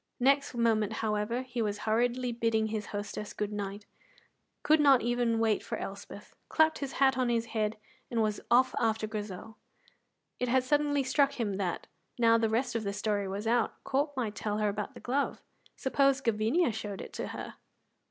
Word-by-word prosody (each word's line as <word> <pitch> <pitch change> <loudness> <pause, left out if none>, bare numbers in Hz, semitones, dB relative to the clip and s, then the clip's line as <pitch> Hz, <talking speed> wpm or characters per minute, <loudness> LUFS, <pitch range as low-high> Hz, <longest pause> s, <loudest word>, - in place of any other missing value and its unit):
Next 275 +1 +3
moment, 225 -3 +2
however, 215 +4 -1
he 245 -2 -4
was 210 -2 -1
hurriedly 240 +3 +1
bidding 230 -2 +1
his 215 -1 -3
hostess 205 0 -5
good 210 0 -3
night, 205 0 -5 0.8
could 310 +1 +5
not 275 -4 +6
even 240 -1 +1
wait 225 -2 +2
for - - -4
Elspeth, - - -8 0.2
clapped 315 0 +3
his 275 -2 -4
hat 265 -1 +3
on 250 -1 +2
his 230 -1 +1
head, 215 -1 0 0.3
and 235 - -1
was 210 -1 -1
off 255 +2 +4
after 220 -1 +1
Grizel. 210 0 -6 0.8
It 250 - 0
had 260 +1 +3
suddenly 290 +1 +2
struck 275 +1 +2
him 205 -5 -2
that, 185 -4 -2 0.3
now 230 -1 +5
the 225 -1 +1
rest 245 +3 0
of 230 -1 -1
the 200 -1 -2
story 205 -1 -1
was 200 +3 -4
out, 230 0 +1
Corp 285 +1 -1
might 225 -5 -1
tell 210 0 -2
her 210 -1 +1
about 205 0 -4
the - - -9
glove. 275 +3 -1 0.3
Suppose 275 0 +2
Gavinia 230 +7 +2
showed 205 -2 -5
it - - -8
to - - -4
her! - - -7
230 Hz, 180 wpm, -30 LUFS, 210-255 Hz, 0.8 s, not